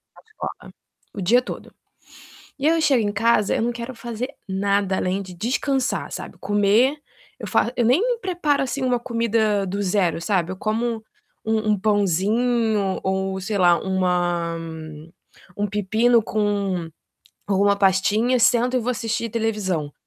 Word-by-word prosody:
A - - -17
escola, 435 -1 -8 0.4
o 200 - -6
dia 230 +7 +4
todo. - - -8 0.8
E 285 +2 0
aí 330 - +3
eu - - 0
chego 260 -8 +3
em - - -1
casa, 210 0 +2
eu - - 0
não 235 +1 0
quero 240 +2 -7
fazer 235 +2 -5 0.2
nada 195 0 0
além 185 +2 -1
de 185 -2 -9
descansar, 255 +7 -1
sabe, - - -7
comer 205 +7 +2 0.4
eu - - -6
faço 235 - +1
eu 240 - +1
nem 435 - +2
preparo, 345 -8 0
assim, 270 +1 -3
uma 250 -1 +1
comida 230 -4 0
do 195 +2 -3
zero, 185 -4 +1
sabe. 185 -2 0
Eu 190 - -6
como 225 +2 -2 0.4
um 220 -1 0
um 205 - -2
pãozinho 210 +1 +1
ou, 190 0 -1
sei 205 +2 -3
lá, 175 -2 +5
uma 175 -3 0 1.0
um 205 0 -1
pepino 220 +4 +2
com 200 -5 -1 0.6
ou 195 -1 +2
uma 200 0 +4
pastinha, 205 +6 +2
sento 245 +2 +3
e - - +2
vou 240 +2 -1
assistir 230 -1 -2
televisão, 205 -9 -2
215 Hz, 155 wpm, -22 LUFS, 190-240 Hz, 1.0 s, lá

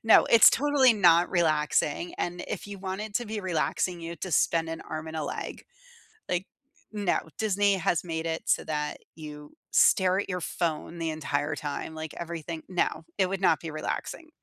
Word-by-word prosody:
No, 225 - +7
it's 230 - +8
totally 275 -2 +4
not 175 -4 +5
relaxing, 155 -1 +1
and 175 0 -3
if - - -4
you 205 -1 -7
want 190 +1 -5
it 215 -1 -6
to 240 - 0
be 215 0 -4
relaxing, 175 0 -1
you 165 0 -6
have 170 - -9
to 185 - -4
spend 165 +1 +2
an 165 0 -5
arm 155 0 -6
and 160 0 -6
a 155 - -2
leg. 145 - -5 0.7
Like, 180 +2 -1 0.5
no, 205 -4 +1 0.2
Disney 205 -2 +2
has 175 -2 0
made 165 -2 -4
it 160 0 -2
so - - +2
that 150 -1 -2 0.2
you 150 -2 -10 0.2
stare 185 0 +4
at - - -6
your 180 -1 -2
phone 165 0 -3
the 165 -1 -1
entire 145 -1 -2
time, 150 +1 -5
like, 160 -1 -6
everything 170 -1 -5
no, 175 -2 0
it 190 - +3
would 195 +1 -3
not 160 - +4
be 165 - -6
relaxing. 155 - -4
170 Hz, 190 wpm, -28 LUFS, 160-190 Hz, 0.7 s, it's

